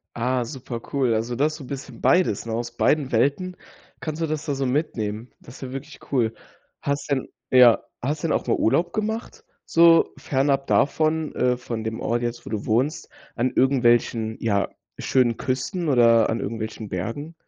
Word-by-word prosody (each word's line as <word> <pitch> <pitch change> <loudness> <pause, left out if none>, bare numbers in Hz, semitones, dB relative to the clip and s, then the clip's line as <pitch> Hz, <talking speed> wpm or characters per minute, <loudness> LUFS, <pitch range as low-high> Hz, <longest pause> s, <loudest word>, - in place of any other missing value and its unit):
Ah, 125 +1 0
super 125 -2 -7
cool. 130 -5 +2
Also 115 +2 -1
du 140 - 0
hast 155 0 +1
so 140 - -10
'n - - -11
bisschen 135 -3 -8
beides, 175 - +2
ne? 115 - -4
Aus 120 +1 -3
beiden 145 +1 +2
Welten 145 +10 +1 0.4
kannst 155 +1 -5
du 165 - +1
das 150 0 -3
da 145 - -1
so 135 0 -1
mitnehmen. 120 -5 -2
Das 120 - -14
ist - - -16
ja 130 -1 -6
wirklich 140 +2 -8
cool. 115 -5 +1 0.5
Hast 140 +1 -2
denn 135 -2 0 0.2
ja, 125 -2 +7 0.2
hast 145 +5 -2
denn 160 - 0
auch - - 0
mal - - +3
Urlaub 170 +9 +1
gemacht, 220 +2 -3 0.2
so 165 0 +5
fernab 135 0 0
davon 155 +1 +1
äh, 125 -1 +2
von 115 -2 -5
dem 110 0 -4
Ort 120 +1 -1
jetzt, 120 0 -4
wo - - -7
du 105 -2 -3
wohnst, 130 +9 0 0.3
an 125 +2 0
irgendwelchen 120 -4 +2
ja, 100 -3 0 0.3
schönen 120 -3 +2
Küsten 135 +6 -2
oder 115 -4 +5
an 115 - -1
irgendwelchen 110 0 -5
Bergen? 115 - -4
130 Hz, 185 wpm, -24 LUFS, 115-145 Hz, 0.5 s, ja